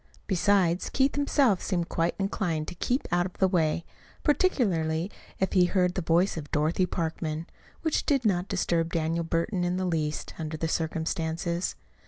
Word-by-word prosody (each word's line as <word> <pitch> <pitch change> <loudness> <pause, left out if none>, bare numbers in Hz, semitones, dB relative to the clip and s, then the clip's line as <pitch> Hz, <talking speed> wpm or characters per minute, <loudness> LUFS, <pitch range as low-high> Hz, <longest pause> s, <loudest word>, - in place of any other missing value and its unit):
Besides, 190 -2 +2
Keith 270 +1 +2
himself 280 -8 +2
seemed 175 -4 -1
quite 165 +1 0
inclined 180 -6 -1
to - - -7
keep 245 +9 -1
out 175 +1 +2
of 180 - -13
the 190 - +4
way 170 -3 +1 0.4
(particularly 190 - +1 0.3
if 190 - 0
he 180 -2 +5
heard 180 -1 +2
the 185 - -2
voice 170 +3 +2
of 145 -2 -6
Dorothy 160 +5 +1
Parkman), 160 -2 -3 0.4
which 320 -2 0
did 275 -4 +2
not 185 -3 +2
disturb 170 -4 0
Daniel 165 +1 0
Burton 170 +3 -1
in 175 +1 0
the 185 - -1
least, 155 -3 -2
under 155 -1 -4
the 165 - -1
circumstances. 165 +1 -1
175 Hz, 165 wpm, -28 LUFS, 165-195 Hz, 0.4 s, he